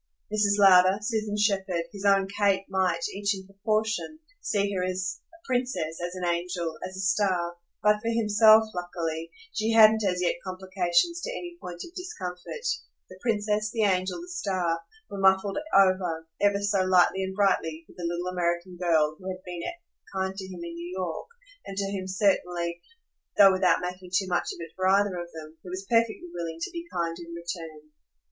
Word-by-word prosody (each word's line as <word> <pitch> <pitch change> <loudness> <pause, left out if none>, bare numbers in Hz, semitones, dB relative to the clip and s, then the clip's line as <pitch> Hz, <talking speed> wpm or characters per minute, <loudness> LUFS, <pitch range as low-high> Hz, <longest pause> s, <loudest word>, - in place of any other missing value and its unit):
Mrs. 205 -1 +3
Lowder, 190 -1 +7
Susan 215 -1 -2
Shepherd, 195 -4 +1
his 200 -1 -8
own 195 -1 +4
Kate, 200 -1 +1
might, 180 -3 +1
each 200 0 0
in 190 0 -9
proportion, 215 +8 -1 0.2
see 200 -1 0
her 185 -1 -1
as 185 0 -2
a 335 - -18
princess, 245 - -1
as 175 +1 -4
an 180 -1 -3
angel, 170 -1 -2
as 185 0 -6
a - - -3
star, 185 -3 +1 0.3
but 210 0 +4
for 230 - -1
himself, 220 -1 +6
luckily, 165 -2 -4 0.2
she 225 +1 0
hadn't 220 -1 +7
as 180 -2 +1
yet 175 - +1
complications 185 - 0
to - - -4
any 355 -8 -6
point 175 -1 -7
of 340 - -16
discomfort: 355 - -6 0.4
the 185 - -13
princess, 215 -2 0
the 225 -1 0
angel, 185 - +1
the 350 - -9
star, 185 - -1 0.3
were 200 - -7
muffled 190 +2 +3 0.2
over, 185 -4 +3
ever 200 0 +3
so 200 -1 +2
lightly 185 +1 +4
and 190 0 -4
brightly, 165 -5 +1
with - - -18
the 175 - -8
little 175 +1 -3
American 175 0 -1
girl 160 -3 +2
who 185 - -9
had 185 0 -6
been 175 -1 -6 0.5
kind 190 0 -1
to 190 -1 -6
him 180 -2 -8
in 170 0 -6
New 170 +1 -7
York 175 -4 -3 0.4
and 195 - -8
to 200 0 -1
whom 190 -2 -4
certainly 180 -3 0 0.6
though 200 -2 +9
without 185 -2 +3
making 180 0 -6
too 190 +2 +2
much 175 -1 0
of - - -8
it 165 - -16
for 185 0 0
either 200 0 +3
of 175 -1 -5
them 160 0 -10
he 180 - -10
was 185 +2 -5
perfectly 230 -1 +2
willing 165 -2 -4
to 165 - -4
be 340 -1 -6
kind 165 -1 -2
in 170 0 -8
return. 165 -3 -7
190 Hz, 185 wpm, -27 LUFS, 175-205 Hz, 0.6 s, though